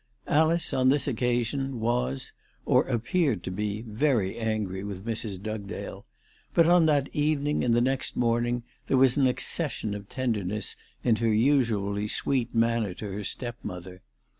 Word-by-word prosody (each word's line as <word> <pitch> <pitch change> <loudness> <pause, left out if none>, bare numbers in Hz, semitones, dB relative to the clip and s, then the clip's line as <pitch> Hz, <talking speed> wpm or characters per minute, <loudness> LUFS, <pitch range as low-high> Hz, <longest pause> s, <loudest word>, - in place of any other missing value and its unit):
Alice 160 +2 +2
on 130 0 +3
this 140 0 +2
occasion 125 +1 -1
was, 70 - -1 0.3
or - - +3
appeared 125 - 0
to - - -4
be, 105 +3 -3
very 110 -3 0
angry 110 -4 -2
with 100 -1 -6
Mrs. 110 -4 -3
Dugdale; 105 -1 -6 0.5
but 165 - +6
on 175 -1 +5
that 145 -3 +2
evening 150 0 +1
and 120 -2 +3
the 120 - +3
next 130 +1 0
morning 120 0 +1 0.2
there 135 - +2
was 130 -1 +6
an 140 -3 +4
accession 110 -3 -1
of 100 -1 -8
tenderness 105 -5 -2 0.3
in 115 -3 +3
her 115 0 +1
usually 110 -4 +2
sweet 120 +1 -1
manner 115 -4 +1
to 105 0 -6
her 100 +2 -4
stepmother. 95 -6 -5
115 Hz, 150 wpm, -27 LUFS, 105-135 Hz, 0.5 s, but